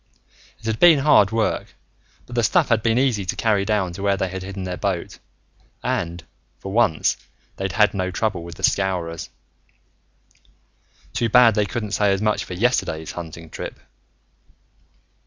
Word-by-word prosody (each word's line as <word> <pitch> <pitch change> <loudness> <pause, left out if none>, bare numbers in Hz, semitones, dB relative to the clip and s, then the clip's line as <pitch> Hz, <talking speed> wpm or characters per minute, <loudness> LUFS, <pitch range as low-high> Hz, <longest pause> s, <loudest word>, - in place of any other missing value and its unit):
It - - -18
had 110 0 -1
been 170 -3 +7
hard 140 -8 +5
work, 110 -1 -1 0.5
but 120 - -10
the 120 - +2
stuff 110 - +2
had 115 -2 +3
been 115 +1 +1
easy 125 -6 +1
to 90 - -3
carry 105 -3 +1
down 100 -5 0
to 95 - -8
where 100 -1 +1
they 95 0 -1
had 95 +1 -6
hidden 95 0 -6
their 90 -1 -3
boat. 95 -3 -3 0.6
And, 85 0 -2 0.3
for 95 - -7
once, 100 -7 +2 0.4
they'd 95 -1 -3
had 105 -1 +3
no 95 -2 -1
trouble 95 -1 -1
with 85 -1 -9
the - - -13
Scowrers. 90 -4 0 1.8
Too 115 - 0
bad 120 0 +6
they 105 -1 +1
couldn't 110 -1 -4
say 105 -1 +2
as 95 - +1
much 105 0 0
for - - -7
yesterday's 90 -7 0
hunting 80 -1 -9
trip! - - -7
100 Hz, 165 wpm, -22 LUFS, 90-110 Hz, 1.8 s, been